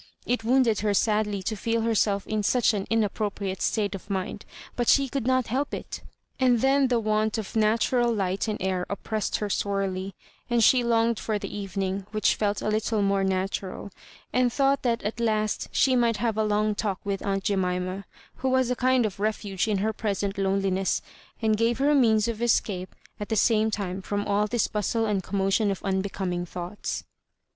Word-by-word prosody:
It 245 -2 -1
wounded 235 -2 +3
her 205 -1 +1
sadly 210 -2 +1
to 215 +4 -2
feel 230 +2 -1
herself 210 -3 +1
m 215 -1 -1
such 230 +3 +3
an 200 -2 -3
in 225 -1 +3
appropriate 200 -2 -3
state 205 -3 0
of 195 +1 -8
mind, 195 +1 -3 0.3
but 240 -1 -1
she 275 -1 +5
could 260 -2 -3
not 255 -1 +2
help 275 +5 -2
it; - - -7 0.4
and 250 -3 +4
then 270 0 +4
the 245 -2 +2
want 215 0 0
of 220 -1 -6
natural 230 +3 +2
light 195 -2 -1
and 215 - -2
air 185 -1 0
oppressed 215 +1 -2
her 210 - -2
sorely, 195 -2 -2 0.3
and 240 -1 +3
she 250 +2 +5
longed 230 -1 +2
for 215 -2 -1
the 205 - -6
evening, 195 -1 -3
which 215 -2 +2
felt 205 -1 -1
a - - -1
little 215 0 0
more 195 0 +2
natural, 190 +1 -2 0.4
and 250 -1 +3
thought 275 +2 +2
that 235 -2 0
at 215 +3 -3
hist 215 -2 0
she 260 -1 +3
might 235 -3 +2
have 225 0 0
a 220 - +1
long 210 0 +1
talk 205 -3 -2
with 200 -1 -3
aunt 195 -1 -1
Jemima, 185 0 -1 0.3
who 265 - -1
was 260 -1 +2
a - - +1
kind 255 -1 +2
of 200 -2 -4
refuge 205 -2 -1
in 210 -2 +1
her 215 +3 0
present 200 -2 -2
loneliness, 195 -1 0 0.4
and 220 -1 +3
gave 230 +1 +1
her 280 +2 +2
a - - +4
means 220 -5 +4
of 230 -1 -3
escape 200 -5 0 0.2
at 210 - -5
the 220 - 0
same 220 0 +3
time 195 -3 -3
from 205 +1 -2
all 205 +1 +1
this 240 +1 +1
bustle 220 +2 -1
and 205 -3 0
commotion 195 +3 +1
of 195 - -3
unbecoming 190 -2 -1
thoughts. 180 +3 -5
210 Hz, 195 wpm, -26 LUFS, 195-230 Hz, 0.4 s, she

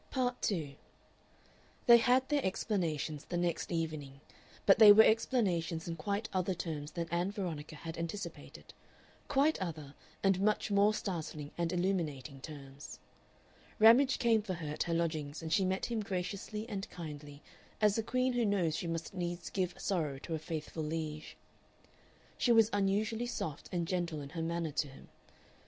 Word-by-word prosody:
Part 250 -2 -1
2 160 -9 -1 1.1
They 235 -1 +9
had 255 +2 +3
their 295 -2 +1
explanations 165 -7 -2
the 175 - -3
next 175 0 -1
evening, 155 -5 -3 0.5
but 195 - +6
they 215 -2 +11
were 215 +2 +9
explanations 180 -9 +1
in 165 - -3
quite 200 +6 -2
other 185 0 0
terms 155 -3 -5
than 170 -1 -3
Ann 175 +2 0
Veronica 165 -7 -5
had 165 +2 -7
anticipated, 170 +5 -6 0.5
quite 290 -2 +2
other 155 -6 -5 0.3
and 195 -1 +3
much 210 0 +1
more 205 +1 +4
startling 155 -7 -4
and 170 -1 -1
illuminating 160 -7 -2
terms. 140 -1 -9 0.8
Ramage 245 +5 +6
came 230 -3 +3
for 190 -3 -4
her 160 -3 -6
at - - -5
her 170 - -1
lodgings, 155 -2 -2
and 160 0 -2
she 195 - +4
met 190 +1 0
him 235 -2 -2
graciously 200 +3 -4
and 200 -3 -5
kindly 150 -3 -9 0.4
as 210 -2 +4
a - - +2
queen 255 +3 0
who 245 -1 +1
knows 190 -7 +1
she 170 - -3
must 165 +1 -4
needs 175 -1 -4
give 185 -2 -2
sorrow 155 -8 -1
to 165 - -6
a 160 - -1
faithful 160 0 -5
liege. 155 0 -4 1.0
She 245 - +3
was 225 -1 +5
unusually 210 +4 +1
soft 160 -9 -5
and 170 -2 -1
gentle 175 -4 -1
in 140 - -8
her 165 +2 -5
manner 165 -1 -2
to 145 +1 -1
him. 135 - -14
175 Hz, 165 wpm, -33 LUFS, 155-210 Hz, 1.1 s, they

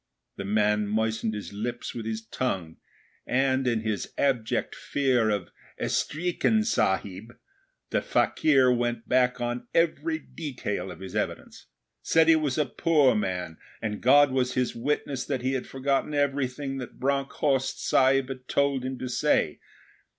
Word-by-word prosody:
The 100 - -6
man 105 0 +2
moistened 110 +1 -1
his 105 -1 -7
lips 120 +4 -4
with 115 -2 -5
his 110 0 -4
tongue 95 -9 -3 0.5
and, 130 0 +1
in 115 -2 +1
his 110 -2 -3
abject 125 -6 0
fear 130 -5 +1
of 100 -4 -2 0.3
'Estreekin 180 +7 0
Sahib', 100 - -1 0.6
the - - +1
fakir 135 -5 +3
went 120 -1 -2
back 125 0 +2
on 120 0 -3
every 175 - +1
detail 120 - -5
of 90 -1 -10
his 95 - -8
evidence - - -4 0.3
said 160 0 +3
he 165 - +7
was 150 -4 0
a 150 - +2
poor 145 +1 +3
man, 90 -6 -3 0.2
and 105 -2 -4
God 145 +2 +6
was 130 -1 0
his 125 -1 0
witness 135 +1 -2
that 130 -3 -3
he 130 +1 0
had 130 - -3
forgotten 135 +2 -1
everything 140 -1 -1
that 125 - -9
Bronckhorst 135 0 0
Sahib 135 0 +3
had 130 -1 -7
told 140 -2 +1
him 130 0 -4
to 130 - -5
say. 125 - +1
125 Hz, 150 wpm, -27 LUFS, 110-140 Hz, 0.6 s, he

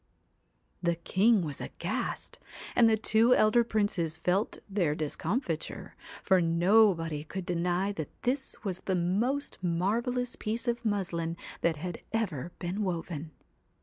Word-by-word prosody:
The 170 -1 +1
king 195 +5 +3
was 150 -3 -5
aghast, - - -4 0.4
and 230 -2 +6
the 220 - +3
two 225 +3 +4
elder 215 +3 +5
princes 205 -8 0
felt 180 +6 0
their 180 -7 +1
discomfiture, 160 - -3 0.3
for 190 -2 +4
nobody 170 -2 +3
could 185 +3 -6
deny 180 +2 0
that 160 -7 -5
this 265 +1 0
was 190 -4 -2
the 190 - -1
most 215 +11 0
marvellous 225 +8 0
piece 230 +3 -3
of 240 0 0
muslin 170 -6 -1 0.2
that 170 -1 +2
had 175 +3 -6
ever 175 - -2
been 185 +4 -3
woven. 165 -4 -3
185 Hz, 130 wpm, -30 LUFS, 170-220 Hz, 0.4 s, and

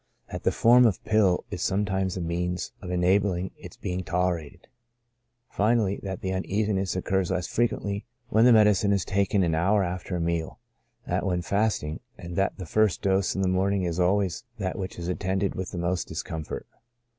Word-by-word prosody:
That - - -5
the - - +2
form 120 +1 +6
of 100 - -1
pill 105 -5 +3
is 95 -3 -4
sometimes 95 -1 0
a - - -3
means 90 +1 -2
of 90 - -7
enabling 90 +1 +1
its - - -12
being 90 0 -3
tolerated. 85 -3 -2 0.8
Finally, 105 -2 +1
that 95 -2 -5
the 95 0 -2
uneasiness 95 0 -1
occurs 95 0 0
less 90 -2 -1
frequently 105 -3 -1 0.2
when 110 0 +4
the 125 - +7
medicine 105 -2 +5
is 100 -2 0
taken 100 0 +1
an 85 -2 +1
hour 95 +5 +3
after 90 +1 -3
a - - -1
meal, 85 -1 -2 0.5
than - - -1
when 90 -3 0
fast 105 +1 +1
ing, 75 +1 -4 0.2
and 85 0 -8
that 95 +1 0
the 95 - -6
first 105 +1 +1
dose 95 -1 +1
in 95 - 0
the - - +2
morning 95 +1 +1
is 85 0 -2
always 95 +1 +1
that 95 -3 -2
which 95 -1 -5
is 85 -1 -5
attended 95 +2 -1
with 95 -1 -4
the - - -7
most 85 +1 -1
discomfort. 80 -2 -5
95 Hz, 185 wpm, -26 LUFS, 90-100 Hz, 0.8 s, the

